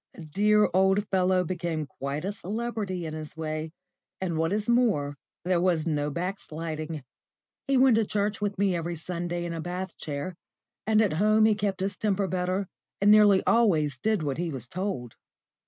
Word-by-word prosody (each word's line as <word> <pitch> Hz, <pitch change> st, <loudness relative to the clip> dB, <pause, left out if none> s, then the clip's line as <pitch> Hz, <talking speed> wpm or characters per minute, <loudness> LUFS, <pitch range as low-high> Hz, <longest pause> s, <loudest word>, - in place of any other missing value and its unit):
The 165 Hz, -, -9 dB
dear 210 Hz, +6 st, +3 dB
old 190 Hz, +2 st, +3 dB
fellow 185 Hz, -1 st, +2 dB
became 170 Hz, -3 st, -3 dB
quite 140 Hz, +4 st, -5 dB
a 195 Hz, -, -1 dB
celebrity 205 Hz, -3 st, -4 dB
in 155 Hz, -, -5 dB
his 155 Hz, 0 st, -8 dB
way, 155 Hz, 0 st, -3 dB, 0.5 s
and, 180 Hz, -3 st, -2 dB
what 160 Hz, +2 st, 0 dB
is 210 Hz, +1 st, -1 dB
more, 215 Hz, -, +2 dB, 0.3 s
there 180 Hz, -1 st, +2 dB
was 175 Hz, -4 st, +2 dB
no 150 Hz, -3 st, 0 dB
backsliding; 160 Hz, -3 st, -4 dB, 0.6 s
he 275 Hz, -1 st, +3 dB
went 255 Hz, -3 st, +5 dB
to 225 Hz, -, +2 dB
church 205 Hz, 0 st, -1 dB
with 205 Hz, -1 st, -1 dB
me 195 Hz, -2 st, +2 dB
every 170 Hz, 0 st, -3 dB
Sunday 175 Hz, +1 st, -3 dB
in 170 Hz, -, -4 dB
a 165 Hz, -, -4 dB
bath 180 Hz, +1 st, -5 dB
chair, 145 Hz, +4 st, -4 dB, 0.5 s
and 220 Hz, 0 st, +4 dB
at 205 Hz, -, +1 dB
home 215 Hz, +5 st, +4 dB
he 220 Hz, -, +5 dB
kept 200 Hz, -2 st, -2 dB
his 195 Hz, +1 st, -2 dB
temper 205 Hz, -2 st, 0 dB
better, 185 Hz, +1 st, -1 dB, 0.3 s
and 205 Hz, +1 st, +5 dB
nearly 210 Hz, -2 st, +6 dB
always 155 Hz, -, +3 dB
did 215 Hz, +1 st, +1 dB
what 145 Hz, 0 st, -2 dB
he 175 Hz, -1 st, -1 dB
was 130 Hz, -5 st, -5 dB
told. 175 Hz, -, -4 dB
185 Hz, 180 wpm, -27 LUFS, 160-205 Hz, 0.6 s, nearly